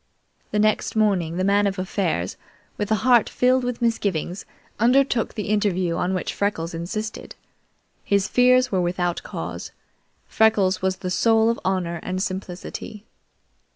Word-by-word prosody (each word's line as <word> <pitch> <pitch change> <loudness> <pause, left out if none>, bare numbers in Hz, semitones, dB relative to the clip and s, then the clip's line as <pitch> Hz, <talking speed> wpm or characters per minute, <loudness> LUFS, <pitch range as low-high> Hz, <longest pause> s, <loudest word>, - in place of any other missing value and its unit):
The - - -2
next 215 +1 +1
morning, 190 -6 +1
the 185 - 0
Man 200 +1 +3
of 195 0 -2
Affairs, 185 - -2 0.4
with 205 0 -3
a - - +5
heart 245 -4 +5
filled 255 +1 +2
with 245 -1 -3
misgivings, 200 -6 -1 0.3
undertook 245 0 +2
the 210 -2 -4
interview 185 -5 +1
on 185 +2 -1
which 185 - -3
Freckles 175 -5 -2
insisted. 215 +6 -5 0.7
His 200 -1 +1
fears 250 +2 +4
were 190 -2 +1
without 175 0 -1
cause. - - -6 0.5
Freckles 200 -4 +2
was 190 0 0
the 180 - -4
soul 225 +3 +3
of 235 - -4
honor 180 -3 -1
and 185 0 -3
simplicity. 190 +1 -6
200 Hz, 145 wpm, -23 LUFS, 185-220 Hz, 0.7 s, a